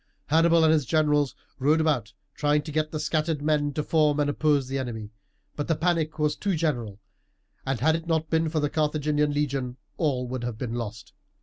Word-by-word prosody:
Hannibal 165 +2 +4
and 160 0 +5
his 150 -5 +1
generals 150 -2 +2 0.2
rode 150 +4 +3
about 145 -9 +1 0.2
trying 150 0 +1
to 155 - -7
get 155 +1 0
the 155 - -3
scattered 155 -1 -1
men 150 -1 +1
to 150 - -1
form 150 -2 +2
and 145 0 +2
oppose 145 -3 +1
the 135 +1 -2
enemy; 110 -5 -5 0.4
but 145 - -3
the 165 - +2
panic 165 -1 0
was 150 -1 +1
too 200 -3 -1
general, 120 -11 -2 0.7
and 135 -3 -1
had 160 +3 +4
it 165 0 -5
not 160 -1 0
been 160 0 +2
for 155 0 -1
the 145 - +1
Carthaginian 150 -1 +1
legion 135 -4 -2 0.2
all 130 -6 0
would 125 -1 -4
have 120 -2 -4
been 115 -1 -4
lost. 110 -3 -6
150 Hz, 200 wpm, -26 LUFS, 135-155 Hz, 0.7 s, and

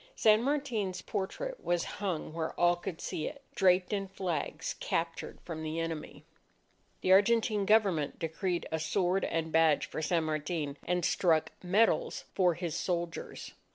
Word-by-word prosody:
San 215 0 +5
Martin's 245 -9 -1
portrait - - -4
was 175 -1 +1 0.2
hung 175 -6 -2
where 160 -1 -4
all 175 0 +5
could 175 -1 -6
see 155 - -3
it, 280 - -8
draped 185 +1 +3
in 195 -1 -1
flags 175 -5 -3
captured 165 0 -2
from 160 -2 -6
the 160 +1 -3
enemy. 165 -2 -5 0.8
The 185 - +2
Argentine 210 0 +4
Government 195 -9 +3
decreed 170 +2 -2
a 160 - 0
sword 180 +3 +1
and 160 0 -2
badge 160 -2 +4
for - - -5
San 165 +1 +1
Martin, 155 -1 -2
and 180 0 +1
struck 165 -4 +2
medals 225 - +2
for 180 -3 +3
his 170 -2 -3
soldiers. 170 -1 -3
175 Hz, 150 wpm, -31 LUFS, 160-200 Hz, 0.8 s, San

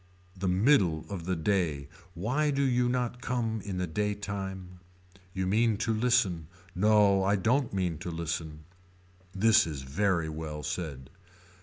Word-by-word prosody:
The 95 0 -3
middle 90 - +3
of 90 -4 -5
the 95 0 0
day. 80 -5 0 0.3
Why 130 - 0
do 140 -1 +1
you 125 -2 +2
not 125 -1 -2
come 115 -3 -2
in 100 -2 -4
the 90 - -1
day 105 +5 -1
time. 95 -3 -6 0.5
You 95 0 -2
mean 110 +3 +2
to 115 +1 0
listen. 110 -8 +1 0.3
No 100 0 +4
I 100 +2 +3
don't 120 +7 +1
mean 90 -5 -1
to 90 - -5
listen. 80 -2 -4 0.7
This 110 +1 +5
is 70 -4 -5
very 85 +4 0
well 75 -1 -6
said. 70 -7 -5
95 Hz, 150 wpm, -29 LUFS, 85-110 Hz, 0.7 s, This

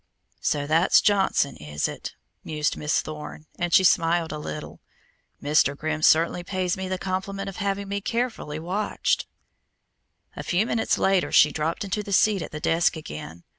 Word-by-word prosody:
"So 145 -1 0
that's 165 +5 +4
Johnson, 195 -8 +2
is 75 0 -3
it?" - - -7 0.3
mused 150 -1 -1
Miss 150 +1 0
Thorne, 155 0 -8
and 175 -1 -1
she 190 - +6
smiled 170 -2 +3
a 150 - -5
little. 150 0 -7 0.6
"Mr. 145 -1 +3
Grimm 155 0 -3
certainly 165 +3 +3
pays 185 -1 -1
me 190 0 -4
the 185 0 -2
compliment 195 +1 -3
of 195 - -9
having 200 0 -2
me 200 +1 -3
carefully 230 -10 -2
watched." 185 +6 -1 1.1
A - - -5
few 185 +5 +1
minutes 230 -1 0
later 190 -2 +2
she 150 - +6
dropped 160 +6 -2
into 200 +1 -2
the 200 -1 -5
seat 200 0 +3
at - - -5
the 150 - -7
desk 165 +3 +2
again. 85 - -8
175 Hz, 170 wpm, -25 LUFS, 155-195 Hz, 1.1 s, she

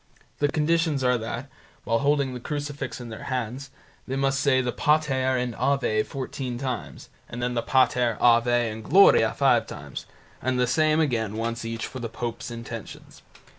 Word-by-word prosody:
The 145 - +3
conditions 155 -1 +1
are 125 -1 +3
that, 115 +4 -5 0.4
whilst 115 +2 +1
holding 140 -2 +1
the 125 - -5
crucifix 145 0 -4
in 120 -1 -8
their 110 - -8
hands, 130 +1 -3 0.4
they 130 - -2
must 135 0 +1
say 140 -2 +3
the 125 -1 0
"Pater" 135 -4 +1
and 125 -1 -2
"Ave" 135 -6 +1
fourteen 130 0 -5
times, 130 -2 -5 0.2
then 120 +1 -2
the 120 - 0
"Pater", 125 -2 +2
"Ave", 120 0 +4
and 110 +1 -8
"Gloria" 195 - +5
five - - +3
times, - - -8 0.3
and 130 +1 0
the 125 - +4
same 155 +5 +2
again 115 -8 0
once 115 +1 -3
each 115 0 -4
for 130 - -7
the 115 -2 -4
pope's 120 +1 -5
intentions. 115 -2 -9
125 Hz, 170 wpm, -25 LUFS, 115-140 Hz, 0.4 s, Gloria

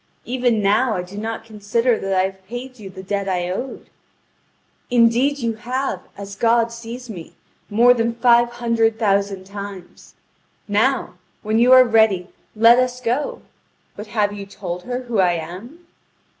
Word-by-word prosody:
Even 245 -4 0
now 215 +4 +2
I 180 - -2
do 180 +2 -12
not 225 +1 -5
consider 225 +3 0
that 195 - -4
I 185 - +3
have 190 0 -6
paid 250 +2 -8
you 200 -2 -9
the 190 0 -10
debt 200 0 -2
I 180 -1 -1
owed." 255 +8 -6 1.0
"Indeed 245 +4 +3
you 230 -4 -2
have, 245 -2 -3 0.2
as 200 0 -8
God 230 +2 +2
sees 235 +2 -8
me, 180 -8 -10 0.3
more 235 +4 +5
than 230 -1 -1
five 240 0 +4
hundred 230 -2 +1
thousand 200 -3 0
times. 200 -2 -10 0.5
Now, 225 +6 0 0.2
when 220 +1 +1
you 245 +2 +5
are 255 0 +9
ready, 220 -6 +2 0.3
let 230 +3 +6
us 250 0 0
go. 250 +4 -2 0.5
But 210 +1 -8
have 210 -1 0
you 200 -1 -8
told 180 -3 -7
her 250 +1 -4
who 240 -4 -2
I 180 -2 +4
am?" 190 - -8
225 Hz, 160 wpm, -20 LUFS, 200-240 Hz, 1.0 s, are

